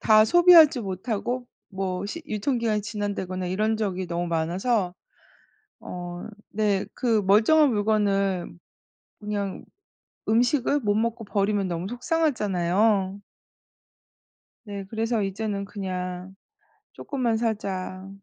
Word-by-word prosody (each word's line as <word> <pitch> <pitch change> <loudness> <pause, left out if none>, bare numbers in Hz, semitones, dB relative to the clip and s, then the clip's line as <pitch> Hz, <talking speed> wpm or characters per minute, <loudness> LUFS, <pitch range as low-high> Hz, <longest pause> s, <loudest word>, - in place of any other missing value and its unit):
다 215 -1 +6
소비하지 335 -2 +7
못하고 220 +5 -3 0.2
뭐 190 -1 -3
시 335 +10 -6
유통기한이 220 -1 -1
지난다거나 200 -4 -3
이런 215 +4 0
적이 190 -4 -2
너무 175 0 -2
많아서 180 +4 0 0.9
어 175 0 -7 0.2
네 205 -2 +1
그 225 -4 +1
멀쩡한 255 +9 +5
물건을 200 - +1 0.7
그냥 205 -2 -4 0.6
음식을 250 +5 +2
못 205 -4 +1
먹고 225 +1 -1
버리면 200 -1 0
너무 175 0 -3
속상하잖아요. 210 - +1 1.4
네. 200 -2 -6
그래서 225 0 0
이제는 200 +1 -3
그냥 185 -2 -5 0.6
'쪼끔만 250 -6 -1
사자 195 -4 -3
205 Hz, 235 characters per minute, -25 LUFS, 190-225 Hz, 1.4 s, 소비하지